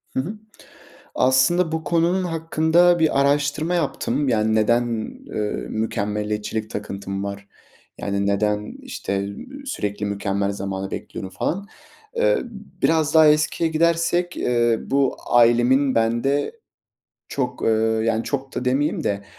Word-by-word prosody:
Hı - - +1
hı, 180 +11 -3 0.8
aslında 160 +7 +3
bu 160 -1 -2
konunun 170 +4 +1
hakkında 165 +1 +3
bir 155 -4 +2
araştırma 145 +4 +1
yaptım. 145 -3 -1
Yani, 110 -1 +2
neden, 120 +3 +2 0.4
eee, 105 -1 -2
mükemmeliyetçilik 105 0 -2
takıntım 100 -1 -5
var, 100 0 -6 0.5
yani, 100 0 -1
neden 105 +1 0
işte, 100 0 -3
ııı, 270 - -9
sürekli 105 - -3
mükemmel 100 0 -1
zamanı 95 -1 -4
bekliyorum 95 - -6
falan. 195 - -3 0.5
Eee, - - +3 0.4
biraz 160 -1 +2
daha 160 -1 +7
eskiye 155 +2 +2
gidersek, 170 +2 +1
eee, 120 -2 +2
bu 135 -1 +1
ailemin 120 +3 +4
bende 120 - +1 0.8
çok, 125 -2 -3
eee, - - +3 0.3
yani, 115 0 0
çok 135 -1 -4
da 125 - -3
demeyeyim 135 +4 0
de, 100 0 -1
130 Hz, 125 wpm, -22 LUFS, 105-160 Hz, 0.8 s, daha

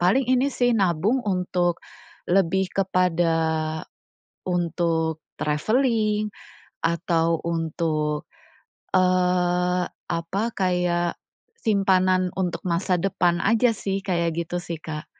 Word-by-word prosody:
paling 200 +10 +3
ini 260 +2 +3
sih 245 -2 +1
nabung 195 +2 +2
untuk 180 -2 0 0.5
lebih 190 0 +2
kepada 180 -3 +1 1.1
untuk 165 -2 0 0.2
traveling 215 - +1 0.5
atau 165 -1 +1
untuk, 160 -2 -1 0.7
eee, 180 -1 +2 0.2
apa 170 +4 -2
kayak 180 -2 0 0.4
simpanan 185 - +2
untuk 180 -2 -1
masa 180 +1 0
depan 175 -2 +1
aja 230 +3 +3
sih 195 0 -2
kayak 170 -3 0
gitu 175 +2 -5
sih, 170 -1 -5
Kak. 155 -1 -6
180 Hz, 95 wpm, -24 LUFS, 170-195 Hz, 1.1 s, paling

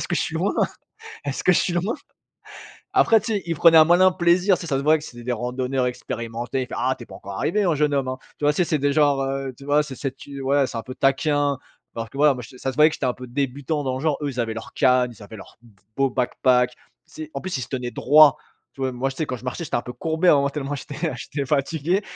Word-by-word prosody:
Est-ce - - -3
que - - 0
je - - +1
suis - - -4
loin? - - 0 0.7
Est-ce 140 -1 -3
que 185 - +6
je - - +3
suis 180 - -1
loin?». 190 +7 0 1.0
Après 225 -2 +5
tu 220 +1 -3
sais, 200 - -1
ils 165 - -1
prenaient 165 +1 +6
un 155 - +9
malin 180 +3 +5
plaisir, 180 +2 +3
tu - - -9
sais, - - -6
ça 135 -3 0
se - - -2
voyait 155 +1 +5
que 150 - -11
c'était 120 -5 -10
des 125 - -1
randonneurs 125 +2 -1
expérimentés, 120 +1 -4
il - - -4
fait: - - -6
«Ah! 130 +2 +1
Tu - - -10
es - - -23
pas - - -11
encore 100 0 -9
arrivé, 205 +5 +1
hein, 175 -4 +2
jeune 150 0 +1
homme, 135 -2 0
hein». 130 - -3 0.2
Tu - - -4
vois 150 - +5
c'est 180 - +2
c'est 160 -3 0
des 140 +1 +1
genre, 145 -2 +3
heu, 135 0 -3
tu 140 - -12
vois 145 +1 +3
c'est 140 - -8
c'est 135 -1 -4
tu 140 0 -9
ouais 140 +1 +2
c'est 115 - -5
un - - -4
peu 130 - -8
taquin, 145 +1 +1 0.4
parce 115 -1 -5
que 135 - -9
ouais 150 0 +5
moi 125 - -7
je - - -11
se 130 - -14
ça 135 - -2
se - - -15
voyait 155 +1 +7
que - - -6
j'étais 130 - -2
un 125 - 0
peu 125 0 -9
débutant 140 +3 -2
dans 130 -1 -1
le - - -7
genre, 155 -2 +1
eux 145 - -1
ils 125 - -9
avaient 115 -1 -2
leur 115 -1 -8
canne, 125 -2 +3
ils 105 - -14
avaient 105 +2 -10
leur 100 - -13
d 115 - -19 0.2
beau 135 0 +2
Backpack. 125 0 +2
Tu - - -20 0.5
sais, 155 - -15
en 140 - -3
plus 180 -2 -4
ils 130 - -4
se - - -5
tenaient 125 -2 -3
droit, 145 +4 +6 0.4
tu - - -13
vois 130 -1 0
moi 130 +2 -2
tu 135 - -10
sais 155 - -2
quand 125 - -3
je 125 - -15
marchais 130 +7 -4
j'étais 150 - -6
un 120 - -1
peu 125 - -7
courbé, 160 +6 0
à - - +8
un - - +5
moment, 140 0 +1
tellement 145 -1 -4
j'étais 150 +4 -4
j'étais 140 -1 -5
fatigué 155 +6 0
140 Hz, 305 wpm, -23 LUFS, 125-155 Hz, 1.0 s, un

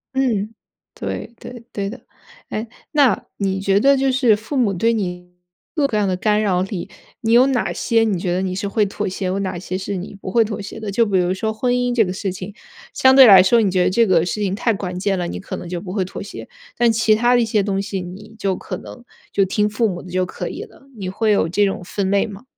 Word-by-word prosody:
嗯， 225 -5 0 0.4
对， 235 - -5
对， 240 -1 -10
对 200 -1 -3
的。 245 +5 -9 0.5
哎， 220 +2 -4 0.2
那 285 -5 +3
你 195 -1 -1
觉 195 0 +3
得 275 +5 +5
就 270 0 +1
是 250 -5 +4
父 220 +7 -5
母 215 -6 +2
对 225 +6 +2
你 180 -5 -4 0.4
各 305 -4 0
种 - - +4
各 215 - -1
样 210 - +2
的 185 -2 0
干 210 +2 +2
扰 185 -4 +1
里， 190 -2 -4 0.3
你 225 - 0
有 245 +3 +6
哪 265 -2 0
些 230 -2 +1
你 205 -6 0
觉 175 0 -1
得 185 - 0
你 190 -1 -2
是 195 +2 -3
会 210 +1 +1
妥 205 +1 -3
协， 190 0 -3
有 190 +2 -1
哪 190 -2 -3
些 185 +1 -4
是 195 +1 -4
你 185 +2 -6
不 - - -5
会 230 +4 +4
妥 210 -1 -5
协 210 +2 -8
的？ 210 -2 -4
就 230 +4 +3
比 200 -3 +1
如 180 0 +1
说 220 +3 -2
婚 245 +3 0
姻 245 0 0
这 225 - +5
个 180 - -3
事 195 +1 -3
情， 190 +2 -7 0.4
相 260 0 +5
对 270 -1 +10
来 195 -5 +9
说 225 +5 +4
你 195 -3 +1
觉 185 -1 +2
得 - - +3
这 230 +5 +3
个 175 -5 +3
事 210 +4 -3
情 195 -2 0
太 225 +3 +1
关 185 -2 -4
键 195 0 0
了， 175 -1 -2
你 - - -5
可 190 - -6
能 180 - -7
就 180 - -3
不 185 0 -7
会 195 -2 0
妥 185 - -7
协。 200 - -9 0.3
但 240 -1 +4
其 220 -1 +3
他 240 +3 +3
的 - - +4
一 230 - +2
些 215 -2 +1
东 195 -1 -1
西， 195 -1 -4
你 200 +5 -10
就 195 -3 -1
可 - - -6
能 245 - -12 0.3
就 195 -1 +2
听 210 +2 +1
父 220 +2 +1
母 180 -3 -4
的 180 - -12
就 185 0 +1
可 - - -5
以 - - -6
了， 275 - -17
你 190 -2 -5
会 215 +3 0
有 200 -5 +2
这 205 +5 +2
种 195 - -2
分 195 0 -2
类 200 - +2
吗？ 205 +1 -10
205 Hz, 285 characters per minute, -20 LUFS, 185-225 Hz, 0.5 s, 对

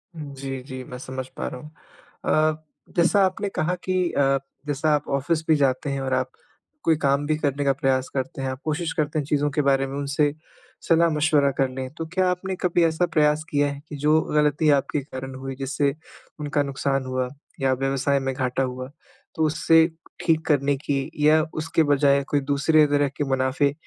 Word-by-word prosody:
जी 140 -3 -6
जी, 130 -1 -7
मैं 125 0 -9
समझ 130 0 -6
पा - - -3
रहा - - -6
हूँ। 150 - -12 0.8
अ, 155 0 -10 0.3
जैसा 175 +4 +4
आपने 200 +2 -2
कहा 180 -1 -1
कि 185 -1 +1
अ, 135 -1 +2 0.3
जैसा 150 +2 0
आप 150 - -3
ऑफिस 155 +4 0
भी 160 - +5
जाते 140 -1 +1
हैं 140 0 -2
और 130 0 -2
आप 130 0 0 0.5
कोई 165 - +4
काम 140 0 +1
भी 155 - +2
करने 145 -2 -1
का 135 - +4
प्रयास 135 -2 0
करते 130 0 -3
हैं 135 - -1
आप 130 0 -5
कोशिश 160 +2 -1
करते 155 0 -1
हैं 145 - -3
चीज़ों 145 0 +1
के 150 - +1
बारे 135 -1 +2
में 135 +1 -5
उनसे 145 +1 +1 0.5
सलाह-मशवरा 155 -3 +3
कर 135 -1 +2
लें। 130 0 -5
तो 165 - -3
क्या 185 -1 +2
आपने 185 +1 -2
कभी 175 -1 +2
ऐसा 165 +2 +2
प्रयास 150 0 +3
किया 145 0 +2
है 140 - -7
कि 150 - -6
जो 150 +2 +3
गलती 150 0 +2 0.2
के 145 - 0
कारण 130 -1 -7
हुई 135 0 -6
जिससे 140 +1 0 0.4
उनका 145 -1 0
नुकसान 135 -1 -1
हुआ 130 0 -1 0.3
या 135 -1 +3
व्यवसाय 135 +1 0
में 135 0 -2
घाटा 130 0 0
हुआ 130 0 -4 0.5
तो 160 - 0
उससे 160 +1 +4 0.4
ठीक 160 -1 +2
करने 140 -2 +2
की? 135 -1 -2 0.2
या 155 +1 +6
उसके 160 +1 +1
बजाय 140 -1 +3
कोई 145 - +2
दूसरे 155 +2 +4
तरह 145 -1 +2
के - - 0
मुनाफ़े 135 +2 +1
145 Hz, 195 wpm, -24 LUFS, 135-155 Hz, 0.8 s, या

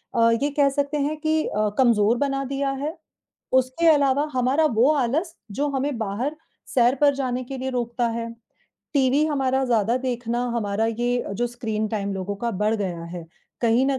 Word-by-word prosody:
अ, 230 0 +5
ये 290 - +2
कह 280 -1 +3
सकते 285 +1 -1
हैं 295 +2 -1
कि 315 0 +1
अ, 210 0 0
कमज़ोर 235 -3 +4
बना 275 0 0
दिया 275 +1 -1
है, 315 +4 -3 0.6
उसके 260 +6 +2
अलावा 285 0 +3
हमारा 260 +5 +2
वो 255 +6 +5
आलस 300 +7 0 0.2
जो 290 +6 -1
हमें 275 -1 -1
बाहर 230 +8 -2 0.4
सैर 245 0 +4
पर 285 -1 +5
जाने 255 -2 -2
के 270 +2 -6
लिए 265 +1 -3
रोकता 240 -1 -1
है, 230 0 -3 0.6
टीवी 275 +2 +3
हमारा 265 -3 +1
ज़्यादा 230 -1 +2
देखना, 245 -2 -2
हमारा 210 0 0
ये 240 +2 -1
जो 240 +4 0
स्क्रीन 220 -3 -3
टाइम 200 -2 -2
लोगों 195 +1 -4
का 235 +3 -2
बढ़ 210 +2 0
गया 180 -5 -3
है, 170 -1 -8 0.3
कहीं 235 +3 +3
न 270 -1 +1
250 Hz, 180 wpm, -24 LUFS, 230-280 Hz, 0.6 s, अ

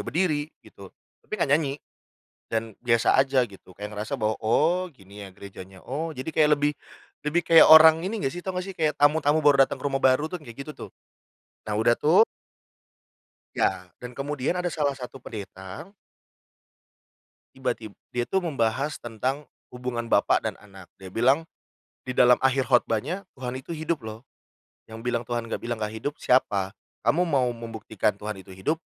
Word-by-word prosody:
berdiri 155 -4 0 0.2
gitu, - - -13 0.3
tapi - - -29
enggak 140 - 0
nyanyi 145 -2 +1 0.7
dan 110 -2 -4
biasa 115 0 +2
aja 135 -1 +4
gitu, 100 -5 -9
kayak 105 +2 -7
ngerasa 105 +4 -4
bahwa, 110 -4 -1
oh 165 +11 +2
gini 100 -2 -12
ya 95 - -14
gerejanya, 95 -1 -11
oh 155 +4 -4
jadi 130 +4 -5
kayak 155 -1 +3
lebih, 145 0 +1 0.6
lebih 170 +4 +2
kayak 165 0 +7
orang 160 0 +9
ini 215 +1 -3
enggak 135 - 0
sih, 175 - -7
tahu 185 +1 -5
enggak 180 +1 -3
sih - - -9
kayak 155 -2 +1
tamu 145 +2 +4
tamu 150 +1 +2
baru 140 -2 +6
datang - - -7
ke - - -13
rumah 135 - 0
baru 135 +4 +3
tuh, 180 - -4
kayak 135 -3 -9
gitu 150 - -9 0.2
tuh. - - -18 0.8
Nah, 105 - -1
udah 115 +2 +4
tuh 160 - +5 1.3
iya, 90 - 0 0.2
dan 125 - -6
kemudian 145 +4 -2
ada 180 - -2
salah 145 -5 -1
satu 130 +1 -9
pendeta. 100 - -9 1.6
Tiba-tib 120 -5 -4 0.2
dia 120 0 -2
itu 190 - 0
membahas 140 -2 -1
tentang 130 +5 -3 0.2
hubungan 125 -2 -5
bapak - - +3
dan - - -4
anak. 95 -3 -15
Dia 95 - -11
bilang 130 - +2 0.6
di 130 - -3
dalam 125 -1 +6
akhir 135 0 +1
khotbahnya, 130 - +1
"Tuhan 125 -1 -5
itu 130 +6 -7
hidup 160 +1 -2
loh, 110 +1 -8 0.7
yang 110 0 -10
bilang 120 -1 -2
Tuhan 120 -1 -2
enggak - - -2
bilang 120 0 -3
enggak 105 -1 -4
hidup, 145 +6 -3
siapa? 100 -7 +1 0.3
Kamu 165 +11 +2
mau 130 -5 +2
membuktikan 115 -3 -3
Tuhan 105 0 -6
itu 95 0 -13
hidup? 155 +13 -1
130 Hz, 175 wpm, -25 LUFS, 110-150 Hz, 1.6 s, orang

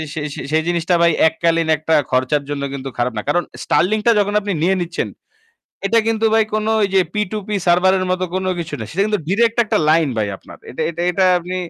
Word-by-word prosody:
সেই 155 -2 -3
সেই - - -6
সেই 155 0 +2
জিনিসটা 175 0 +1
ভাই, 170 0 +5 0.2
এককালীন 165 0 0
একটা 155 +1 -1 0.2
খরচের 130 +3 +1
জন্য 140 -1 -3
কিন্তু 135 -1 -5
খারাপ 125 0 -1
না। - - -1
কারণ 175 +4 +2 0.2
Starlink-টা 215 +6 +2
যখন 205 0 0
আপনি 205 - -3
নিয়ে 185 +4 +2
নিচ্ছেন, 170 0 -3 0.8
এটা 230 +3 +3
কিন্তু 225 0 +1
ভাই 225 0 +4
কোনো 215 0 0
ঐ - - +3
যে 190 - +5
p2p 210 -1 -3 0.2
সার্ভারের 185 +2 +3
মতো 185 0 -1
কোনো 185 0 -1
কিছু 170 -1 -6
না। - - -4
সেটা 185 - -1
কিন্তু 210 -1 0
ডাইরেক্ট 225 +5 +1
একটা - - +1
লাইন 160 -2 +3
ভাই, 105 -1 0
আপনার। - - -14
এটা - - -6
এটা 170 0 -5
এটা 190 +2 +1 0.2
আপনি 180 +2 -6
175 Hz, 210 wpm, -18 LUFS, 160-205 Hz, 0.8 s, ভাই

